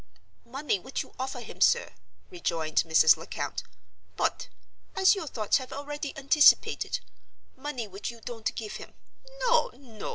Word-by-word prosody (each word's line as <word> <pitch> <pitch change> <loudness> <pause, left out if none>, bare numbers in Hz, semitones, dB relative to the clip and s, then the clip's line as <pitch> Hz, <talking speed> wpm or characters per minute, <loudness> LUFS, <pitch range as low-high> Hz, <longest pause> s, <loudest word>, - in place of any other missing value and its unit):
"Money 270 -3 -1
which 260 +8 -4
you - - -19
offer 260 -1 -4
him, 230 - -11
sir," - - +4 0.4
rejoined 165 - -3
Mrs. 160 0 +6
Lecount; - - -4 0.6
"but—as 380 - 0
your 385 -6 -4
thoughts 215 -6 +1
have 260 -2 -7
already 290 +1 -5
anticipated—money 275 -2 +1
which 195 +1 -6
you 235 -1 -10
don't 225 -1 -4
give 215 -2 -5
him. - - -12 0.5
No! - - +3
no! 230 -7 -9
260 Hz, 130 wpm, -28 LUFS, 215-290 Hz, 0.6 s, Mrs